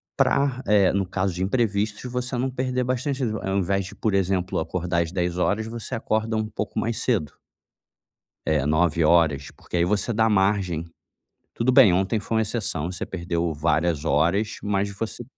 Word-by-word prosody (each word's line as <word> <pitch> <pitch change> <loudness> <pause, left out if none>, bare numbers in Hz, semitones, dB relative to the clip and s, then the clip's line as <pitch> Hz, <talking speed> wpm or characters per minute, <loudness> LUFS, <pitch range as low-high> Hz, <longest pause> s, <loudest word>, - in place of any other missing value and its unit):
pra, 135 -2 +2
eh, 100 -3 +4
no 100 0 +1
caso 95 0 -1
de 90 +2 -2
imprevistos, 105 0 0
de 125 - -6
você 125 +1 -3
não 130 +2 0
perder 130 0 -1
bastantes 130 +2 -2
o 110 -4 -1
ao 95 +1 -1
invés 100 +1 0
de, 95 - -10
por 110 - -1
exemplo, 95 -1 0
acordar 85 +1 -1
às 80 - -7
10h00 90 +4 0
você 115 0 -5
acorda 110 0 -1
um 110 0 -1
pouco 105 -1 -4
mais 115 0 -1
cedo. 100 - 0 1.1
Eh, 75 -3 +2
9h00 80 -2 +2
porque - - -6
aí 85 - +3
você 105 +5 0
dá 110 0 +3
margem. 95 -5 +1 0.7
Tudo 120 +3 +1
bem, 125 -8 +7
ontem 95 +4 +1
foi 110 +2 -2
uma 110 - +3
exceção, 95 -7 -2
você - - -5
perdeu 85 -2 -2
várias 80 0 0
horas, 85 +9 +1
mas 100 0 0
você 110 +2 -5
100 Hz, 175 wpm, -24 LUFS, 85-110 Hz, 1.1 s, bem